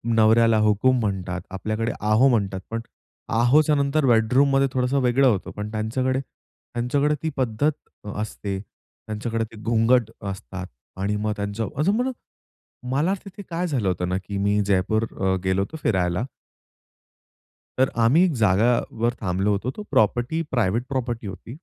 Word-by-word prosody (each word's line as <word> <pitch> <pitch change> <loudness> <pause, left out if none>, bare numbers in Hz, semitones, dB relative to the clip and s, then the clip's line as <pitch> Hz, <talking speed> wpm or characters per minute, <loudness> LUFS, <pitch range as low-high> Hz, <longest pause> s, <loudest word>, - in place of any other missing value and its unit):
नवऱ्याला 115 0 +5
हुकूम 110 +5 +3
म्हणतात. 95 -4 -2
आपल्याकडे 110 +4 -2
आहो 110 +5 +4
म्हणतात. 100 -5 0
पण 115 0 -3 0.6
आहोचं 150 +5 +4
नंतर 140 +1 +1
बेडरूममध्ये 135 +4 +4
थोडसं 130 +2 +1
वेगळं 130 +2 +3
होतं. 105 -7 0
पण 105 +1 -5
त्यांच्याकडे, 130 +4 -1
त्यांच्याकडे 140 +4 -3
ती 160 - 0
पद्धत 130 +4 +1 0.3
अ, 105 - -5
असते. 100 -2 -4
त्यांच्याकडे 110 +2 -6
ते - - -12
घुंगट 115 +1 +3 0.2
असतात 95 -1 -7 0.3
आणि 105 +1 0
मग 105 +1 -1
त्यांचं 100 +1 -3
अजून 185 +9 +2
म्हणा, 250 +3 0 0.8
मला 150 +8 +2
तिथे 200 +1 -9
काय 175 +2 -1
झालं 125 - -1
होतं 90 -1 0
ना, 90 - 0
की 100 +1 -4
मी 100 +1 +1
जयपूर 100 +3 +1 0.2
अ, 95 0 +2
गेलो 95 +1 +2
होतो 130 +11 -4
फिरायला. 90 +1 +1 1.5
तर 130 0 +3
आम्ही 145 +11 +5
एक 180 - +1
जागावर 115 +2 +2
थांबलो 95 +1 0
होतो. 105 +6 -1
तो 210 - -5
प्रॉपर्टी, 120 +9 +2
प्रायव्हेट 115 -2 +1
प्रॉपर्टी 120 -4 -3
होती. 100 +5 -8
115 Hz, 145 wpm, -24 LUFS, 100-130 Hz, 1.5 s, नवऱ्याला